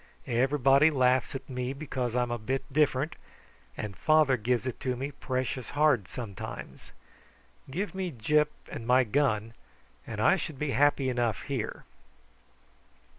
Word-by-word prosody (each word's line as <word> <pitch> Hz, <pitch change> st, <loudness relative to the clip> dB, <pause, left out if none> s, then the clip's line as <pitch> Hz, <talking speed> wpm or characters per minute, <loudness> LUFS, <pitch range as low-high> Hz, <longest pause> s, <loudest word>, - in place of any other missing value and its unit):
Everybody 135 Hz, +4 st, +4 dB
laughs 130 Hz, -3 st, +2 dB
at 135 Hz, -, -6 dB
me 125 Hz, 0 st, -3 dB
because 130 Hz, -5 st, -3 dB
I'm 125 Hz, -1 st, +1 dB
a 120 Hz, -, -2 dB
bit 130 Hz, +5 st, -2 dB
different, 150 Hz, 0 st, +2 dB, 0.6 s
and 105 Hz, -2 st, -5 dB
father 155 Hz, -4 st, +4 dB
gives 125 Hz, +2 st, 0 dB
it 130 Hz, -, -4 dB
to 130 Hz, -3 st, -1 dB
me 135 Hz, +4 st, -4 dB
precious 130 Hz, -3 st, -3 dB
hard 145 Hz, -9 st, +2 dB
sometimes. 110 Hz, -6 st, -8 dB, 0.8 s
Give 190 Hz, +10 st, -3 dB
me 190 Hz, -1 st, -2 dB
Gyp 150 Hz, +5 st, +2 dB, 0.2 s
and 115 Hz, -, -7 dB
my 130 Hz, +1 st, +5 dB
gun, 115 Hz, -3 st, 0 dB, 0.5 s
and 110 Hz, -2 st, -5 dB
I 190 Hz, -, +4 dB
should 155 Hz, -4 st, -5 dB
be 150 Hz, 0 st, -2 dB
happy 140 Hz, +1 st, +3 dB
enough 120 Hz, -3 st, 0 dB
here." 130 Hz, -6 st, -4 dB
130 Hz, 140 wpm, -29 LUFS, 120-145 Hz, 0.8 s, my